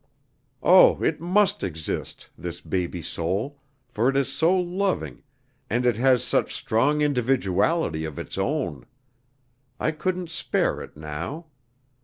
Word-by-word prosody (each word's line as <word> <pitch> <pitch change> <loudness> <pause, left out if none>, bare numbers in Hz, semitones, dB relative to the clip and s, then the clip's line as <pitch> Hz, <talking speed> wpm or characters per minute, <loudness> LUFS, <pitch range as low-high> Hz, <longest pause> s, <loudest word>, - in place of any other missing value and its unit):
Oh, - - +7
it - - 0
must 190 +4 +2
exist, 80 -5 -5
this 85 0 -6
baby 90 -2 -3
soul, 100 - -3 0.3
for 120 +1 +1
it 135 - +1
is 140 - 0
so 170 +4 +3
loving, 185 +2 -1 0.5
and 120 +3 0
it 120 -3 +3
has 125 -1 +4
such - - 0
strong 145 +7 +1
individuality 125 - +1
of 80 -3 -6
its - - -6
own! 65 -5 -2 0.9
I 155 - +1
couldn't 180 +2 -3
spare - - 0
it - - -11
now. 80 - -6
125 Hz, 130 wpm, -25 LUFS, -, 0.9 s, Oh